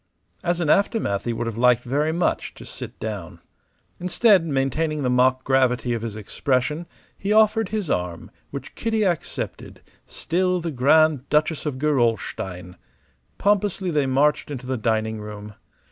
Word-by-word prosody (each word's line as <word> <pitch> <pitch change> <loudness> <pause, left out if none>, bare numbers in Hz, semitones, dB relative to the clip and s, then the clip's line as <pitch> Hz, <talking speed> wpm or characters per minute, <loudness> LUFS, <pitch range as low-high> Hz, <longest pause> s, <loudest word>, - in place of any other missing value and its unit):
As 175 0 0
an 170 - 0
aftermath 175 - +1
he 120 - 0
would 115 +1 -3
have 115 -1 -4
liked 125 0 +4
very 145 +5 0
much 170 +2 -1
to - - -11
sit - - -8
down. - - -6 0.6
Instead, 180 +2 +4
maintaining 150 +2 0
the 125 - +1
mock 130 +1 +3
gravity 130 -2 +2
of 115 - -2
his 115 -2 -5
expression, 130 - -1 0.3
he 195 - -3
offered 215 -1 +4
his 210 -4 -2
arm, 90 - -3 0.2
which - - -7
Kitty 225 -1 0
accepted, 175 -6 -3 0.3
still 180 +2 0
the 165 -1 -3
Grand 145 +1 +3
Duchess 155 +1 +1
of 140 -3 -3
Gerolstein. 115 - -1 0.6
Pompously 200 -2 +1
they 145 -3 +1
marched 145 +4 +2
into 135 -3 -6
the 130 +1 -2
dining 110 -1 -1
room. 105 0 -8
140 Hz, 150 wpm, -23 LUFS, 120-175 Hz, 0.6 s, liked